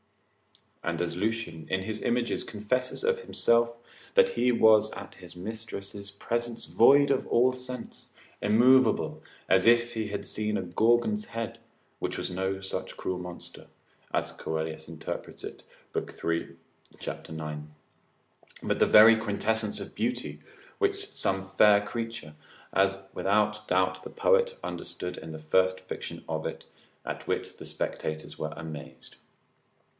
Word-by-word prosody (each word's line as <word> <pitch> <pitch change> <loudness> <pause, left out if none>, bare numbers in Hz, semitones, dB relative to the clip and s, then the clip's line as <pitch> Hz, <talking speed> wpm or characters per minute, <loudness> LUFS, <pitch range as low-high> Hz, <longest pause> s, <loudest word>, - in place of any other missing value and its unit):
And 85 0 -1
as 85 -1 -1
Lucian, 100 -6 -2
in 95 0 0
his 110 +2 -4
images, 120 0 0
confesses 125 - -2
of 470 0 +2
himself, 120 - +2 0.4
that 480 0 +6
he 300 - +2
was 110 -2 +6
at 100 - -8
his 90 -2 -13
mistress's 100 0 -6
presence 115 +3 -3
void 140 +4 +6
of 135 - +1
all 125 +2 +4
sense, 125 -1 -7 0.3
immovable, 125 +5 +4 0.3
as 95 +3 +4
if 120 0 +5
he 110 -2 -2
had 100 -1 -4
seen 105 0 -1
a - - -2
Gorgon's 120 - +2
head: 115 -1 -5 0.4
which - - -2
was - - -3
no 95 +1 -1
such 95 - -5
cruel 90 -1 -2
monster 90 -1 -9 0.4
(as - - 0
Coelius 80 0 -4
interprets 80 -1 -6
it, - - -8 0.3
lib. - - -2
3. 85 0 -2 0.4
cap. - - -6
9.), 75 -1 -6 0.9
but - - 0
the - - +5
very 110 +2 +9
quintessence 110 0 0
of - - -8
beauty, - - -2 0.7
some 95 0 -1
fair 100 +2 +6
creature, 115 -9 -5 0.4
as 95 0 +2
without 105 +1 +1
doubt 95 0 +2
the - - -8
poet 485 0 +2
understood 90 0 -5
in 80 - -8
the 80 - -6
first 95 +4 +2
fiction 95 - -7
of 80 0 -2
it, 80 0 -7 0.4
at - - -5
which - - -2
the - - -9
spectators 80 0 -4
were 75 - -2
amazed. 75 -6 -9
105 Hz, 140 wpm, -28 LUFS, 90-115 Hz, 0.9 s, very